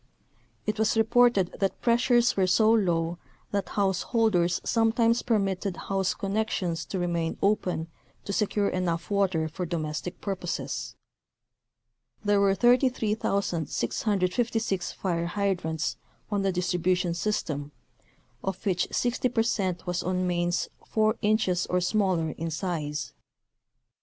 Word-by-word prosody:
It 215 0 -2
was 220 +1 +2
reported 225 -4 +3
that 195 -1 0
pressures 240 0 +3
were 190 -2 +2
so 220 +4 +4
low 175 -6 +1 0.3
that 200 -3 -1
householders 195 -2 +1
sometimes 230 +1 +2
permitted 195 -4 0
house 195 -1 -1
connections 195 -5 -1
to 195 - -4
remain 170 -2 -1
open 185 -5 0 0.4
to 200 - -3
secure 205 +1 +1
enough 175 -1 -2
water 190 -6 +1
for 170 +4 -5
domestic 160 +1 -3
purposes. 190 -4 -4 1.3
There 205 -1 +3
were 195 -1 +4
33,656 210 - +1
fire 170 -3 -1
hydrants 175 -4 -1 0.3
on 205 -1 +1
the 195 0 +1
distribution 180 0 0
system, 155 -7 -2 0.7
of 195 +2 -4
which 180 -3 +1
60 245 +1 0
percent 205 -7 0
was 180 -1 -1
on 185 0 -1
mains 175 0 0 0.2
four 215 0 +2
inches 205 -4 +1
or 180 - +1
smaller 180 -4 +1
in 165 +2 -4
size. 155 -3 -3
190 Hz, 115 wpm, -27 LUFS, 175-215 Hz, 1.3 s, so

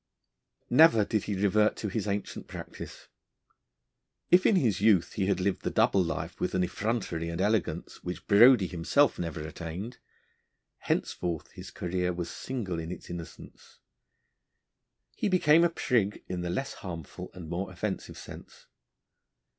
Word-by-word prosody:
Never 125 -6 +6
did 110 -1 -1
he 105 - -2
revert 105 +2 +3
to 110 - -4
his 105 +1 -3
ancient 100 0 -3
practice. - - -9 1.2
If 180 +1 +6
in 220 - +4
his 115 - +2
youth 100 -5 +4
he 95 -2 -1
had 100 -2 +1
lived 95 +1 0
the - - -1
double 95 - +3
life 85 - -4
with - - -1
an 90 - +2
effrontery 95 -4 -2
and 85 +1 -4
elegance 105 0 -1
which 90 0 -6
Brodie 110 0 +7
himself 90 - +2
never 85 -2 -4
attained, 85 +8 -6 0.8
henceforth 85 -3 -2
his - - -10
career 90 0 -2
was 85 -1 -4
single 105 -10 -4
in 80 +1 -5
its - - -8
innocence. 85 -1 -10 1.4
He - - -1
became 170 -3 +5
a 170 - +4
prig 115 -10 0
in 90 -1 -3
the 90 - -3
less 135 +10 -2
harmful 85 -5 -8
and 90 -3 -8
more 90 +4 -3
offensive 95 +2 -4
sense. - - -12
95 Hz, 145 wpm, -29 LUFS, 85-110 Hz, 1.4 s, Brodie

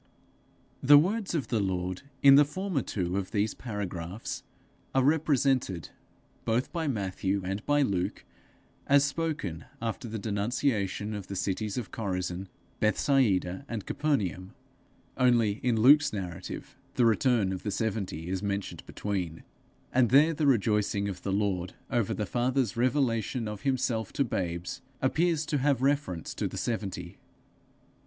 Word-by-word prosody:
The 145 +2 +8
words 195 +4 +1
of 150 - -2
the 115 - +1
Lord 95 -2 -2 0.2
in 140 -1 +9
the 145 +2 +8
former 175 +1 -2
two 90 -4 -2
of 95 -2 -2
these 105 0 0
paragraphs, 100 -4 -5 0.5
are 135 - +4
represented, 135 - +2 0.5
both 115 +3 0
by 165 -3 -1
Matthew 100 -4 -1
and 95 +3 -3
by 145 0 +4
Luke, 95 -8 -2 0.6
as 140 0 +5
spoken 145 - -3
after 115 +3 -3
the 110 0 -4
denunciation 105 0 -1
of 100 -3 -6
the 100 - -5
cities 100 +3 -2
of 120 - -4
Chorazin, 90 -3 -3 0.3
Bethsaida, 105 -4 +2
and 115 -4 -4
Capernaum; 100 - -1 0.6
only 115 -4 +3
in 120 -3 +1
Luke's 145 +5 +6
narrative, 90 -3 -6 0.2
the 125 - +4
return 115 -3 +3
of 95 - -5
the 105 - -3
seventy 100 -6 -2
is 95 0 -2
mentioned 100 -1 -3
between; 90 -6 -3 0.5
and 125 -2 +4
there 150 +5 +6
the 150 -1 0
rejoicing 105 -4 +2
of 90 -2 -6
the 100 - -2
Lord 95 -3 -1 0.2
over 115 -3 +1
the 105 - -2
Father's 125 +2 0
revelation 120 -2 +1
of 105 -1 -6
himself 125 -4 0
to 140 - +2
babes, 90 -7 -3 0.2
appears 160 +3 +1
to 150 -2 0
have 135 -1 +2
reference 135 - 0
to - - -2
the - - -7
seventy. 110 -5 -4
110 Hz, 145 wpm, -29 LUFS, 95-135 Hz, 0.6 s, in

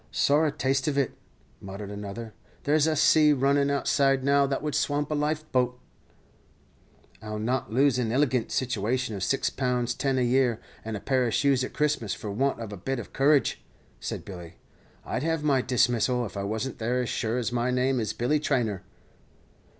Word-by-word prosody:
"Sorra 150 +2 +3
taste 135 0 0
of 145 -2 0
it," 140 -3 0 0.4
muttered 100 +1 -8
another; 105 +2 -7 0.3
"there's 150 +1 +3
a 160 - +1
sea 150 0 +5
runnin' 140 +1 +2
outside 135 -1 +2
now 140 0 +3
that 135 +1 -2
would 150 -1 -2
swamp 145 +1 0
a - - +2
life 150 +1 -1
boat." 125 -1 +1 1.4
"I'll 105 0 -5
not 115 0 -2
lose 135 +2 +3
an 120 -3 0
illigant 130 -2 +1
situation 125 -1 -1
of 95 - -6
six 135 - 0
pounds 125 -2 -1
ten 135 0 -1
a 130 - +2
year, 125 -2 +2 0.2
and 110 -1 -4
a - - -7
pair 130 0 +1
of 115 - -1
shoes 135 -3 +2
at - - -5
Christmas, 150 -8 0
for 105 - -6
want 135 +6 0
of 110 -3 -6
a - - -7
bit 135 +9 -3
of 120 - -8
courage," 140 +1 +2 0.4
said - - -5
Billy; 90 -4 -9 0.5
"I'd 130 - -2
have 165 0 -1
my 140 -3 +3
dismissal 125 -1 +1
if 105 - -9
I 100 0 -3
wasn't 110 +5 -3
there 125 +3 0
as 120 - -4
sure 115 +2 -1
as 125 -1 -1
my 120 +1 0
name 125 +1 +1
is 110 - -1
Billy 130 +6 0
Traynor." 120 -10 0
125 Hz, 190 wpm, -27 LUFS, 115-140 Hz, 1.4 s, sea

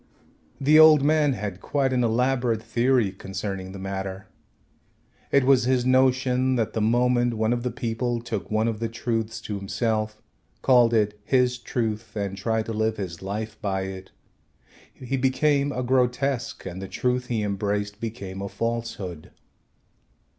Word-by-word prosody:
The 150 +3 +5
old 155 -3 +8
man 150 -1 +3
had 100 -4 -5
quite 135 -2 0
an 125 -1 +2
elaborate 120 -1 +1
theory 120 -3 +2
concerning 95 0 -5
the 100 - -8
matter. 95 0 -5 1.1
It 140 - +4
was 130 -2 +4
his 125 -1 +2
notion 130 0 +3
that 115 -3 -1
the 110 - -1
moment 120 +1 +2
one 110 +1 +1
of 120 - -2
the 125 - -1
people 120 +1 -2
took 110 -6 -5
one 110 +1 +1
of 110 -2 -2
the 115 0 -2
truths 115 -1 -2
to 105 - -4
himself, 110 +1 -2 0.4
called 120 -3 +5
it 105 -1 +1
his 125 +1 +2
truth, 110 -2 -3
and 100 -2 -2
tried 110 +3 -1
to 115 - -4
live 110 +1 0
his 90 -4 -5
life 105 +3 -5
by 95 -3 -1
it, 95 0 -7 0.8
he 130 +1 -4
became 140 +2 +2
a 125 -2 -2
grotesque 125 0 0
and 95 0 -6
the 95 - -5
truth 125 +4 -1
he 115 -3 -1
embraced 100 0 -2
became 100 -4 -6
a 100 - -4
falsehood. 115 -9 -4
115 Hz, 155 wpm, -25 LUFS, 105-125 Hz, 1.1 s, old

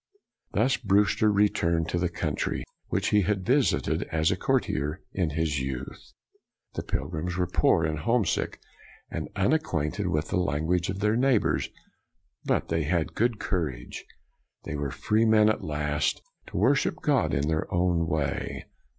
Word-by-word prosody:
r 105 - +4
Thus 125 +1 +2
Brewster 105 -1 +3
returned 85 -5 +2
to 85 - 0
the 90 0 0
country 80 -3 -2 0.2
which - - 0
he 105 - +4
had 95 0 -1
visited 135 +1 +2
as 80 0 +2
a - - +1
courtier 75 +7 -1
in 90 -4 0
his 75 -1 -1
youth. 65 0 -6 0.6
The - - -3
pilgrims 85 +3 -3
were 90 - +2
poor, 85 -1 +2
and 80 -1 -1
homesick, 115 +6 0 0.5
and - - -4
unacquainted 100 - 0
with 75 -3 -1
the - - +1
language 85 +3 0
of 95 +1 -3
their 105 +1 +2
neighbors, 125 -2 +2 0.8
but - - 0
they 80 0 +1
had 85 +2 +2
a - - -24
good 120 0 +1
courage. 75 - -3 0.6
They 80 - -5
were 70 -1 -2
free 110 - +1
at 110 0 +4
last 75 -1 -1 0.2
to - - -6
worship 125 +8 +3
God 140 -5 +2
in 70 +2 0
their 80 0 -1
own 85 -1 +1
way. 75 -4 -2
85 Hz, 155 wpm, -27 LUFS, 75-105 Hz, 0.8 s, r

